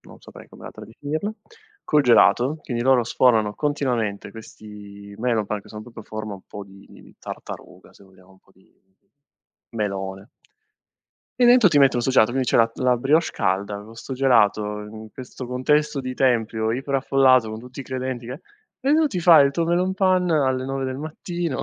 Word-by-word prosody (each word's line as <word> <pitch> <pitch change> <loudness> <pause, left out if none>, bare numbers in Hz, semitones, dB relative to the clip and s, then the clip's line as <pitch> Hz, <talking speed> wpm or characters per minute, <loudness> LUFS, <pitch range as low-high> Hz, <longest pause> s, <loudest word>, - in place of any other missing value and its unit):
non - - -17
saprei - - -14
come - - -15
altra - - -10
definirla, 155 - -5 0.5
col 150 -1 +2
gelato, 125 +3 +4
quindi 120 -4 -4
loro 130 -2 +3
sfornano 110 -3 +2
continuamente 125 -8 -2
questi 105 -2 -12
melonpan 110 -3 -1
che - - -18
sono 105 0 -9
proprio 120 -1 -12
a - - -14
forma 110 -1 -6
un 95 - -13
po' 100 - -9
di 100 0 -17
di - - -17
tartaruga, - - -10
se - - -20
vogliamo, 95 -1 -21
un 95 - -23
po' - - -30
di 95 - -28 1.1
melone. 95 -1 -4 1.1
E 245 - +6
dentro 245 -4 +6
ti 145 - +2
mettono 135 -3 +3
'sto 130 - 0
gelato 120 -2 +3
quindi 130 -2 -1
c'è - - +2
la 115 0 +4
la 125 -1 +1
brioche 150 +7 +2
calda, 100 +2 -2
co' 115 +1 -14
'sto 125 +3 -9
gelato, 105 -5 +2
in 110 +1 -10
questo 130 0 -9
contesto 150 +4 0
di 130 -1 -5
tempio, 115 -4 0
iper-affollato, 135 -2 +2
con 110 +1 -7
tutti 125 +2 -13
i 135 - -6
credenti 130 -2 -5
che 130 +6 -8 0.4
eh 265 +2 0
e 295 - +5
tu 320 -1 +3
ti 185 -10 -3
fai 165 -5 +7
il 140 - -2
tuo 165 +3 -1
melonpan 185 +1 +1
alle 130 -5 +1
9 135 0 -3
del 130 0 -4
mattino 165 +1 -5
125 Hz, 185 wpm, -22 LUFS, 110-140 Hz, 1.1 s, fai